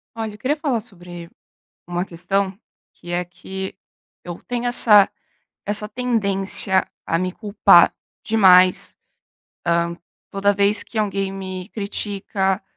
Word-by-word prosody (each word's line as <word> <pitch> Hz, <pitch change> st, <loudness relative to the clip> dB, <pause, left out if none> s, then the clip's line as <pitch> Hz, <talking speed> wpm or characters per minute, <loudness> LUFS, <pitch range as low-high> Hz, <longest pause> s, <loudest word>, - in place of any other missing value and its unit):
Olha, 220 Hz, -2 st, -4 dB
eu -, -, -12 dB
queria 270 Hz, +7 st, -1 dB
falar 280 Hz, -7 st, -1 dB
sobre 175 Hz, -5 st, -11 dB, 0.6 s
uma 175 Hz, 0 st, -2 dB
questão 190 Hz, +2 st, -2 dB, 0.3 s
que 175 Hz, -, -12 dB
é 175 Hz, +1 st, 0 dB
que 190 Hz, +2 st, -8 dB, 0.5 s
eu 175 Hz, -1 st, -7 dB
tenho 245 Hz, 0 st, -2 dB
essa 210 Hz, -4 st, +5 dB, 0.6 s
essa 210 Hz, +1 st, -3 dB
tendência 200 Hz, -5 st, 0 dB, 0.2 s
a 165 Hz, -, +1 dB
me 185 Hz, +1 st, -2 dB
culpar 205 Hz, +1 st, +5 dB, 0.3 s
demais, 185 Hz, -4 st, +4 dB, 0.7 s
hã, 170 Hz, 0 st, 0 dB, 0.3 s
toda 200 Hz, +1 st, +2 dB
vez 200 Hz, +1 st, +3 dB
que 230 Hz, -, -9 dB
alguém 195 Hz, -2 st, -1 dB
me 190 Hz, -1 st, -7 dB
critica, 200 Hz, -2 st, -2 dB
195 Hz, 120 wpm, -21 LUFS, 180-210 Hz, 0.7 s, essa